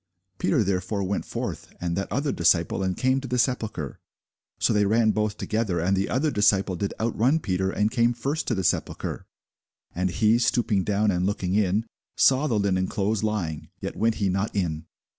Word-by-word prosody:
Peter 95 - +2
therefore 100 +1 -1
went 95 +1 -2
forth, - - -5
and 85 -1 -2
that 100 - -3
other 140 +2 0
disciple, 85 +1 +2
and 95 -1 -1
came 130 +1 +2
to 135 - -6
the 125 0 -1
sepulchre. 125 -3 -1 0.6
So - - +2
they 105 -1 +3
ran 110 +1 +3
both 105 -1 -1
together: 110 -5 -1
and 95 +4 +1
the 95 +1 -1
other 145 +4 +1
disciple 100 -3 +2
did 100 +3 -2
outrun 115 +6 +2
Peter, 95 - -1
and 105 +3 0
came 120 0 +2
first 140 +6 -2
to 120 - +1
the 95 - -2
sepulchre. - - -2 0.7
And 90 +1 0
he 110 +6 +3
stooping 110 -5 +1
down, 105 +1 +1
and 90 0 0
looking 95 -2 -1
in, 105 +1 +2 0.3
saw 135 +3 +4
the 115 - +1
linen 95 -2 +1
clothes 105 0 -1
lying; 95 -8 -2
yet - - -5
went 115 0 +1
he 100 - 0
not 95 +3 -1
in. 80 -5 -2
105 Hz, 190 wpm, -25 LUFS, 95-115 Hz, 0.7 s, saw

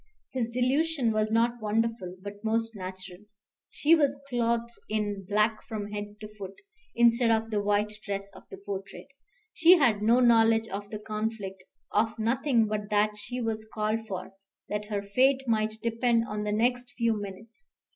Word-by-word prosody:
His 245 -3 -1
delusion 255 +2 +1
was 215 0 +1
not 235 +1 +1
wonderful, 215 -3 -1
but 205 +1 -8
most 225 0 0
natural. 185 -1 -8 0.5
She 310 +3 +3
was 285 -4 +3
clothed 235 -1 0 0.2
in 205 -3 -2
black 215 +1 +2
from 210 -3 -5
head 205 0 -6
to 215 - -6
foot, 195 0 -7 0.4
instead 235 0 +4
of 225 0 +1
the 210 -1 +1
white 205 +1 +1
dress 200 -1 -4
of - - -12
the 195 - -9
portrait. 195 +5 -7 0.4
She 335 +2 +7
had 235 -9 +3
no 230 +4 +4
knowledge 225 -2 +5
of 200 +1 -5
the 215 - -5
conflict, 210 -3 -4 0.3
of 220 +2 +1
nothing 235 +1 +2
but 210 -1 -3
that 210 0 +2
she 245 +4 -5
was 220 -1 -3
called 220 +1 -1
for, 190 -1 -6 0.4
that 210 0 -2
her 205 -1 -3
fate 260 +6 +2
might 220 -1 0
depend 230 0 +2
on 210 0 -3
the 210 - -1
next 245 +3 0
few 230 -2 +2
minutes. 215 - -10
220 Hz, 165 wpm, -28 LUFS, 205-235 Hz, 0.5 s, She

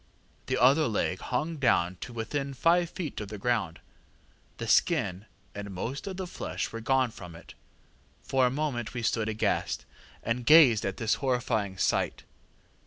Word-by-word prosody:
The - - 0
other 135 +5 +5
leg 100 -4 -1
hung 155 +6 -2
down 95 -9 +2
to 125 - -8
within 135 +4 -3
five 170 +5 +3
feet 160 -11 -5
of 105 - -5
the 105 +1 -7
ground. 105 -6 -1 0.8
The - - -5
skin 95 +4 +2 0.3
and 100 0 -6
most 120 - -5
of 190 -2 -5
the 190 - -3
flesh 175 - -4
were 115 - -6
gone 130 +1 +2
from 90 -5 -10
it. - - -13 0.7
For 130 -1 +2
a - - +1
moment 130 -4 -3
we 120 - -3
stood 110 -1 0
aghast, 110 0 -1 0.4
and 115 +2 -1
gazed 130 -8 +6
at 95 - -4
this 110 -2 +1
horrifying 115 -7 -1
sight. - - 0
120 Hz, 165 wpm, -28 LUFS, 105-140 Hz, 0.8 s, gazed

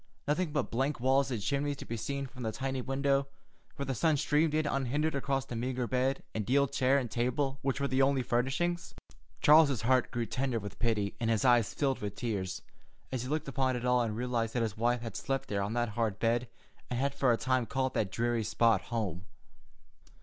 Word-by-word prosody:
Nothing 155 +2 0
but 145 -4 -1
blank 135 +4 0
walls 135 +2 +3
and 120 -4 -2
chimneys 140 +6 -1
to - - -8
be 115 - -4
seen 140 +5 -3
from 130 -1 -11
the 110 -2 -1
tiny 135 +2 -3
window, 135 +1 +1 0.5
where 140 - -3
the 135 - -1
sun 155 +4 +2
streamed 150 +1 +2
in 155 0 +1
unhindered 145 +3 0
across 135 -1 -1
the 120 - -6
meagre 125 +1 -2
bed 130 +2 0
and 110 - -1
deal 140 +6 +3
chair 135 0 +2
and 125 -5 -2
table 130 +4 -1
which 135 0 -1
were 140 - 0
the 130 0 +1
only 135 -1 +3
furnishings. 140 +9 -1 0.5
Charles's 145 -7 +6
heart 130 +1 +3
grew 120 -1 -2
tender 130 0 -1
with 100 -1 -8
pity, 110 -4 0
and 115 -2 0
his 115 +2 +1
eyes 120 -4 +4
filled 135 -2 0
with 105 -1 -4
tears, 95 -6 -3 0.5
as 130 -2 -2
he 125 - -5
looked 155 0 -1
upon 135 -1 0
it 120 0 -3
all 125 0 +3
and 110 -2 -2
realized 120 -2 -1
that 120 - +2
his 110 -2 -2
wife 120 +2 +1
had 115 - -6
slept 135 0 -2
there 100 -1 0
on 100 +3 -2
that 120 -1 0
hard 110 -2 -1
bed, 120 +2 +1 0.4
and 125 - -2
had 140 +1 0
for 135 -3 +2
a 115 - +3
time 130 -2 0
called 130 -1 -1
that 100 -4 0
dreary 120 -1 0
spot 115 -2 +3
home. 95 -6 -4
125 Hz, 215 wpm, -31 LUFS, 115-140 Hz, 0.5 s, Charles's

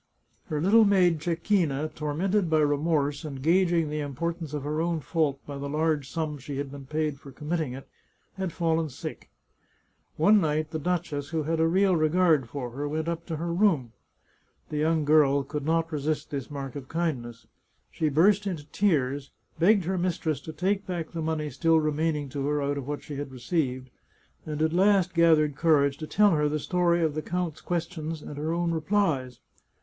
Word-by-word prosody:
Her 150 - -2
little 205 +8 +5
maid 185 -5 +4
Cecchina, 165 -3 0
tor 150 -1 -3
mented 190 +2 +1
by 160 - +3
remorse 145 0 +1
and 140 -4 -6
gauging 170 +1 +2
the 150 - -2
importance 160 +3 -3
of 150 -2 -4
her 150 +2 -1
own 170 -1 0
fault 150 -3 0
by 140 -1 -6
the 140 0 -4
large 150 -2 0
sum 155 -2 -3
she 135 +1 -6
had 140 -1 -4
been 140 -1 -10
paid 150 -1 -2
for 140 - -12
committing 150 0 -3
it, 135 +1 -9 0.5
had 190 -2 -3
fallen 165 -1 0
sick. 125 - -8 0.9
One 205 +6 +5
night 155 -1 0
the 160 - -3
duchess, 155 -4 -2
who 160 -1 -1
had 160 +2 -1
a 160 - +4
real 190 +2 +3
re 155 -1 +2
gard 160 -7 +3
for 125 -4 -5
her, 145 +4 -4
went 155 +2 -2
up 170 0 -3
to 165 - -3
her 170 +2 -3
room. 170 - +2 0.8
The 150 - -3
young 155 0 +1
girl 145 -2 +4
could 150 +1 -5
not 165 0 +1
resist 150 0 -2
this 140 -3 -4
mark 140 -2 -6
of 135 -2 -7
kindness. 120 -9 -3 0.5
She 155 - 0
burst 195 +8 +3
into 165 -6 -4
tears, 140 -8 +1 0.3
begged 195 +3 +4
her 185 +1 -1
mistress 170 -4 -1
to 160 - -7
take 190 +5 -1
back 175 -3 -4
the 165 - -4
money 155 -2 -2
still 165 +5 +3
remaining 155 -1 0
to 140 +1 -3
her 150 0 +1
out 140 0 -1
of 135 - -8
what 145 0 -4
she 145 - -7
had 145 -1 -5
received, 130 -1 -2 0.6
and 155 0 -2
at 160 0 +1
last 190 -1 +3
gathered 160 -4 +4
courage 140 -3 +3
to 155 - -6
tell 210 +3 +4
her 150 -2 +2
the 150 - -1
story 175 +2 +1
of 155 -2 +1
the 155 - -2
count's 175 -2 -3
questions 165 -2 -3
and 145 - -8
her 155 +2 -1
own 170 0 0
replies. 160 -7 0
155 Hz, 195 wpm, -27 LUFS, 145-170 Hz, 0.9 s, little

